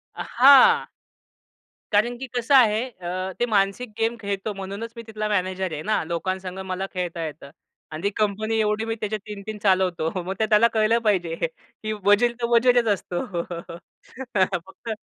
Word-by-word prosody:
अ, - - -4
हां. 285 - +7 1.1
कारण 225 +4 +2
की 265 - -6
कसं 245 +3 +2
आहे 225 -3 +5
अ, 185 -2 -5
ते 240 - +2
मानसिक 210 +2 0
गेम 225 +1 +1
खेळतो 200 +1 -3
म्हणूनच 200 +4 -6
मी 230 - -8
तिथला 215 -1 -3
मॅनेजर 185 -2 -1
आहे 155 - -4
ना. 215 -4 0
लोकांसंगं 185 +3 -4
मला 190 +1 -3
खेळता 175 -3 -3
येतं. 150 -2 -8 0.4
आणि 155 +3 -7
ती 200 - +2
कंपनी 215 +1 0
एवढी 215 +1 0
मी 225 - -2
त्याचे 215 0 -1
3-3 210 0 -8
चालवतो. 185 -4 +2 0.2
मग 190 - -2
ते 220 - +3
त्याला 215 +2 +6
कळलं 225 +1 +3
पाहिजे 175 -6 +1
की 220 - -8
वजीर 205 +4 +4
तर - - +2
वजीरच 240 0 +4
असतो. 175 -2 -4 0.9
फक्त 190 +4 -1
205 Hz, 160 wpm, -24 LUFS, 185-225 Hz, 1.1 s, हां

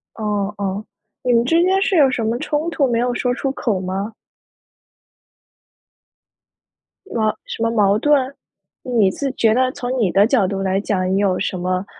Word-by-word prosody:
哦 210 -2 -2
哦， 200 +1 -3 0.4
你 250 - +2
们 235 0 +4
之 330 +7 +3
间 380 +2 +2
是 390 -1 +1
有 285 -4 +6
什 245 -3 -2
么 225 +2 0
冲 300 +5 -1
突 295 -5 +1
没 235 -1 0
有 245 0 0
说 250 0 0
出 270 +2 -2
口 225 -7 -1
吗？ 190 +4 -4 2.9
哇 215 - -1
什 - - -7
么 230 - +2
矛 205 -3 +3
盾？ 280 -1 +2 0.5
你 225 -6 +2
自 275 +6 -3
觉 225 -4 +2
得 255 +2 +2
从 255 0 -4
你 205 - +2
的 200 +3 +5
角 225 -5 +2
度 195 0 -3
来 190 0 0
讲， 185 -3 -1
你 - - +2
有 195 -2 +1
什 185 - -2
么， 185 +1 -1
225 Hz, 190 characters per minute, -20 LUFS, 195-260 Hz, 2.9 s, 有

